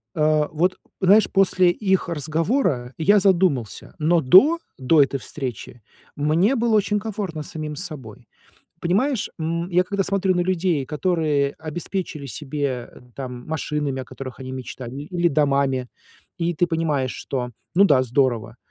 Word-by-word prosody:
Э, 155 -1 +2
вот, 180 +4 +1 0.2
знаешь, 200 +3 +5
после 185 -2 +4
их 190 -1 0
разговора 155 - 0
я 205 +6 +5
задумался, 180 - +1
но 165 +2 +3
до, 250 - +6 0.2
до 145 +3 +4
этой 135 0 0
встречи 125 -4 -7 0.3
мне 165 - +2
было 230 -2 +2
очень 210 0 +1
комфортно 195 -8 -4
с - - -7
самим 155 -2 -5
собой. 145 - -8 0.5
Понимаешь, 215 +8 0
м, 170 +2 -2
я 180 +1 +4
когда 200 0 -1
смотрю 195 -1 +1
на 175 - +1
людей, 175 -5 0
которые 150 -2 0
обеспечили 160 -2 -5
себе 135 -2 -4 0.3
там 125 -2 -7
машинами, 150 -3 -2
о - - -10
которых 130 0 -9
они 130 0 -6
мечтали, 130 -1 -7
или 175 +2 0
домами, 135 -3 +1 0.5
и 170 0 0
ты 175 +3 +2
понимаешь, 155 -6 -1
что, 125 -2 -4 0.2
ну 200 +3 +6
да, 135 -8 +4
здорово, 120 -3 0
155 Hz, 145 wpm, -22 LUFS, 135-185 Hz, 0.5 s, до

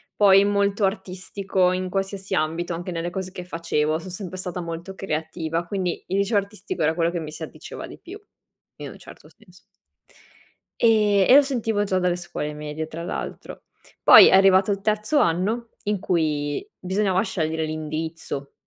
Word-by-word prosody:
poi 195 -1 +6
molto 200 0 +1
artistico 190 -1 -1
in 185 0 -2
qualsiasi 195 0 -3
ambito. 165 +2 -1
Anche 175 +2 -5
nelle 170 0 -3
cose 185 0 -5
che 185 -1 -7
facevo 165 -3 -1
son 185 - -9
sempre 185 0 -7
stata 180 -1 -4
molto 170 +3 -6
creativa, 160 -1 -3
quindi 185 -3 -3
il 190 - -1
liceo 200 +2 +1
artistico 200 -3 -4
era 155 +1 +2
quello 170 -1 +1
che 175 - -3
mi 155 -2 -6
si - - -8
addiceva - - -8
di - - -12
più 380 +4 -10 0.6
in - - -7
un - - -12
certo - - -14
senso. 180 -5 -21 1.2
E 210 -4 +4
e 255 - +9
lo 285 - +9
sentivo 230 -7 -1
già 190 -2 0
dalle 180 -1 +1
scuole 175 -4 -5
medie 150 +1 -5
tra 165 +1 -7
l'altro. 175 - -6 0.4
Poi - - +10
è - - +4
arrivato 195 +1 +5
il 195 -1 -2
terzo 215 +7 +1
anno, 215 - 0
in 210 -1 -1
cui 155 - -1
bisognava 190 0 0
scegliere 160 -5 -2
l'indirizzo. 155 -2 -5
185 Hz, 170 wpm, -23 LUFS, 165-200 Hz, 1.2 s, Poi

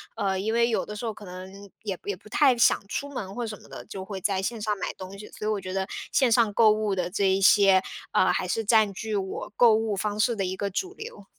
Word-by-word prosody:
呃， 195 -3 -1
因 220 +3 -1
为 235 0 +3
有 225 - 0
的 210 - -7
时 235 - -5
候 220 - -2
可 210 - -12
能 185 +1 -9 0.3
也 195 -4 -4
也 410 +1 -3
不 - - -17
太 270 -4 +4
想 235 - +4
出 285 +6 -4
门 195 -7 -5
或 240 +1 -3
是 215 - -5
什 - - -18
么 - - -16
的， - - -9
就 190 -1 -7
会 195 -2 -6
在 195 -1 0
线 230 0 -3
上 210 -1 -1
买 - - -3
东 190 +1 -9
西。 210 - -10
所 210 - -6
以 - - +1
我 205 - -1
觉 185 0 -6
得 190 0 -1 0.2
线 260 -4 +3
上 225 -2 +4
购 220 -1 +6
物 210 -2 0
的 180 -1 -1
这 200 +1 +1
一 190 +1 +2
些， 195 -1 +6 0.3
呃， 185 - +3
还 185 - -1
是 225 +5 -1
占 215 -2 +4
据 215 +1 -4
我 190 +1 -4
购 235 -3 +6
物 220 -2 0
方 210 +1 -2
式 235 +1 +2
的 195 - -2
一 185 +1 -3
个 200 - -2
主 370 - -3
流。 470 +2 -9
210 Hz, 300 characters per minute, -26 LUFS, 190-225 Hz, 0.3 s, 购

